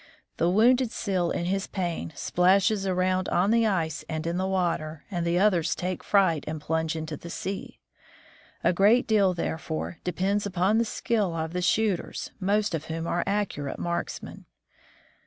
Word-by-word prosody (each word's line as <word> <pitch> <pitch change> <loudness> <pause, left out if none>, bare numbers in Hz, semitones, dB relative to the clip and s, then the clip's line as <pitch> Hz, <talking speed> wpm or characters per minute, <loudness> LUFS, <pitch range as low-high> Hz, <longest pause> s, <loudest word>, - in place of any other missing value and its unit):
The 170 - +2
wounded 240 +6 +4
seal 185 -4 -1
in 170 - -2
his 195 +2 -1
pain 175 -4 -3
splashes 195 +5 +2
around 185 0 +1
on 185 +4 +2
the 230 -1 +4
ice 165 -6 -1
and 160 0 -3
in 170 +1 -1
the 190 +1 0
water, 170 -5 -1
and 175 -2 -1
the 170 +1 +2
others 175 -5 +3
take 180 0 -3
fright 185 -7 +3
and 155 0 -3
plunge 160 +1 -1
into 160 -1 -4
the 170 - -10
sea. 190 +3 -5 0.9
A - - +3
great 210 +7 +4
deal, 200 -4 +3
therefore, 160 0 -4
depends 195 +3 0
upon 190 +3 +2
the 230 - +2
skill 210 -6 -1
of 160 0 -3
the 180 - -1
shooters, 200 0 0
most 205 +1 +1
of 160 -1 -3
whom 165 0 -4
are 175 +1 0
accurate 195 -9 -2
marksmen. 170 0 -4
180 Hz, 165 wpm, -27 LUFS, 165-200 Hz, 0.9 s, wounded